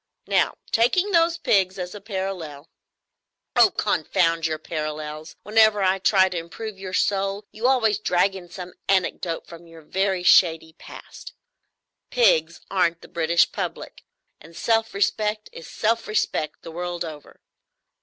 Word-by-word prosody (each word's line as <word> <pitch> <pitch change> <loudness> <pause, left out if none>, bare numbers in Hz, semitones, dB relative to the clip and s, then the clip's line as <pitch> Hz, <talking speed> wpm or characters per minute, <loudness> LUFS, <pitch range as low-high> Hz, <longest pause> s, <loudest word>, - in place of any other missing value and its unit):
Now, - - +1 0.2
taking 360 - +2
those 335 -1 +3
pigs 190 - +1
as 180 -1 -5
a 205 - -9
parallel——" 190 -8 -5 0.9
"Oh, - - +7
confound 165 -3 0
your 155 -1 -2
parallels! 155 0 -6
Whenever 215 -1 +4
I 190 +1 +2
try 190 0 +4
to 180 -2 -3
improve 195 +5 -8
your 190 -1 -7
soul, 195 +2 0
you 225 +4 -1
always 225 -6 +2
drag 195 -1 +2
in 180 -2 -10
some 180 0 -9 0.2
anecdote 185 -3 0
from 170 0 -13
your 165 -1 -14
very 190 +2 -1
shady 160 -3 +4
past. - - -11 0.8
Pigs 175 -9 +2
aren't 170 -3 +1
the - - -13
British 170 -1 +2
public; - - -6 0.4
and 165 +2 -15
self 225 -1 0
respect 210 +1 -1
is 165 - -10
self 230 +1 -1
respect 185 -7 -2
the 165 - -8
world 175 +1 -4
over. 155 -2 -11
185 Hz, 145 wpm, -23 LUFS, 165-210 Hz, 0.9 s, Oh